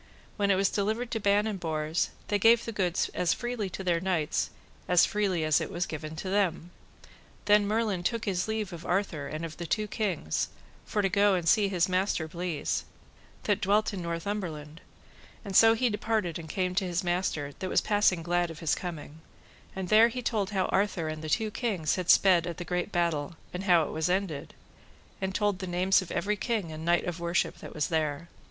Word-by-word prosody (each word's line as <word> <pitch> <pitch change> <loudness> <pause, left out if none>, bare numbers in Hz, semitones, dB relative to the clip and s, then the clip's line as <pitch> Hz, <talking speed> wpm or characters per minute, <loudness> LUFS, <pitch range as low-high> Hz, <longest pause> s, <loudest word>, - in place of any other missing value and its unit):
When 200 -2 +1
it 195 - +5
was 195 +1 +2
delivered 220 +4 -1
to 225 - -1
Ban 205 0 +3
and 210 -3 -3
Bors, 160 -1 -1 0.2
they 205 0 +1
gave 230 +3 +5
the 230 - -3
goods 180 -5 0
as 175 - +1
freely 240 -5 -3
to 190 - -6
their 175 -2 +1
knights 170 -4 0 0.4
as 180 -1 +5
freely 195 -6 0
as 155 -1 +3
it - - -3
was 180 -2 -2
given 155 -1 -6
to 175 - -6
them. 180 -4 0 0.7
Then 205 0 +5
Merlin 215 -3 0
took 230 +5 -1
his 185 -3 -1
leave 215 -4 -2
of 170 -1 -8
Arthur 175 -6 -1
and 155 +3 -4
of 155 -1 -8
the 170 - -5
two 215 +4 0
kings, 185 - -1 0.4
for 210 - 0
to - - +4
go 200 +1 +4
and 175 -2 -2
see 205 +4 +4
his 180 -3 +1
master 185 -3 0
Bleise, 170 -1 -2 0.6
that 205 -1 +1
dwelt 210 +2 +2
in 190 - -4
Northumberland; 170 -3 -4 0.6
and 195 -2 -5
so 225 +2 +7
he 250 +2 +1
departed 210 -5 -1
and 160 -1 -9
came 185 +2 -1
to 190 +1 0
his 175 +2 -1
master, 175 -5 -1
that 185 - -3
was - - +3
passing 205 -5 +2
glad 175 0 +1
of 165 - -8
his 165 -2 0
coming; 160 -3 -6 0.5
and 190 -2 -4
there 220 +2 +7
he 250 +1 -5
told 210 -5 0
how 190 -3 0
Arthur 190 -5 0
and 155 0 -5
the 155 - -4
two 215 +7 0
kings 200 -11 -1
had 180 -2 -4
sped 180 -3 +5
at 170 - -5
the 175 - -6
great 180 +3 -2
battle, 170 -4 0 0.2
and 180 +2 -4
how 175 -4 +5
it - - -4
was 160 +2 -1
ended, 180 -6 -2 0.7
and 190 0 -2
told 205 -3 +1
the 185 - -5
names 185 +3 +3
of 185 - -8
every 210 +1 0
king 210 -5 -2
and 155 0 -7
knight 175 0 +3
of 175 -1 -4
worship 170 +1 -1
that - - -10
was 150 - -1
there. 160 0 -1
185 Hz, 210 wpm, -29 LUFS, 165-205 Hz, 0.7 s, so